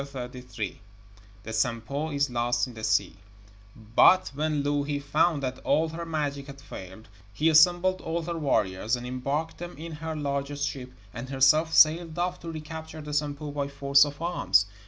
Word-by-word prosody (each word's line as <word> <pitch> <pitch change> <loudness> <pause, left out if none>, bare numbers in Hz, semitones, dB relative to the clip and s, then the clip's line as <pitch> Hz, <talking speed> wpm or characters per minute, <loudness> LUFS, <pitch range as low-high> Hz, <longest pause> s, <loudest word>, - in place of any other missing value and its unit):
THE 105 -6 -9
SAMPO 120 +6 -1
IS 140 -3 0
LOST 120 0 +1
IN 125 - -10
THE 110 -1 -10
SEA 100 -3 +1 0.6
But 115 - +4
when 150 0 -1
Louhi 145 0 0
found 145 +1 +1
that 130 0 -3
all 160 +1 +1
her 165 +1 -6
magic 145 -3 -3
had 140 -1 -10
failed, 95 -5 -10 0.3
she 160 +2 +3
assembled 175 +4 +4
all 165 +1 -3
her 170 +1 -4
warriors, 110 -6 +1
and 120 0 -7
embarked 140 +6 -3
them 175 -2 -7
in 165 +2 -7
her 160 +1 -5
largest 140 -1 -2
ship, 130 -2 -6 0.2
and 120 +2 -7
herself 140 +4 +4
sailed 160 +1 +5
off 180 +1 -1
to 165 - -7
recapture 160 0 -8
the 150 0 -7
Sampo 145 0 -2
by 140 -1 -2
force 140 0 +4
of 145 -1 -4
arms. 170 -11 +2
140 Hz, 165 wpm, -27 LUFS, 125-155 Hz, 0.6 s, sailed